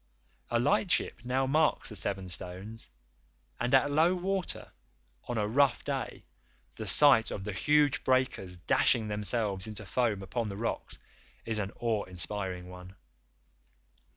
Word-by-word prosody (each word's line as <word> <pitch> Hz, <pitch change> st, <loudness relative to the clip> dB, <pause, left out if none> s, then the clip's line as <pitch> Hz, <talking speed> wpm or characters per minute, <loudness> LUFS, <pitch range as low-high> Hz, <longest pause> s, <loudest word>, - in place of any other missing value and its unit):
A 120 Hz, -, +2 dB
lightship 175 Hz, -, +1 dB
now 130 Hz, +2 st, +1 dB
marks 155 Hz, +3 st, +2 dB
the 105 Hz, -, -8 dB
Seven 95 Hz, -2 st, -2 dB
Stones, 90 Hz, +6 st, -8 dB, 0.7 s
and 120 Hz, -, 0 dB
at 140 Hz, +2 st, +4 dB
low 165 Hz, +5 st, +4 dB
water 190 Hz, 0 st, -3 dB, 0.5 s
on 120 Hz, -, -3 dB
a 105 Hz, -1 st, +1 dB
rough 135 Hz, +3 st, +3 dB
day -, -, -4 dB, 0.5 s
the -, -, -6 dB
sight 140 Hz, -6 st, +5 dB
of 95 Hz, -, -5 dB
the 105 Hz, 0 st, -4 dB
huge 145 Hz, +5 st, +3 dB
breakers 130 Hz, -8 st, 0 dB
dashing 110 Hz, +5 st, +2 dB
themselves 105 Hz, -1 st, -1 dB
into 105 Hz, -1 st, -6 dB
foam 105 Hz, -1 st, 0 dB
upon 115 Hz, +3 st, -2 dB
the 100 Hz, -, -6 dB
rocks 115 Hz, +2 st, -3 dB, 0.5 s
is 110 Hz, -1 st, -1 dB
an 100 Hz, -1 st, -2 dB
awe 115 Hz, -3 st, 0 dB
inspiring 90 Hz, 0 st, -4 dB
one. 90 Hz, +1 st, -11 dB
110 Hz, 140 wpm, -30 LUFS, 95-130 Hz, 0.7 s, sight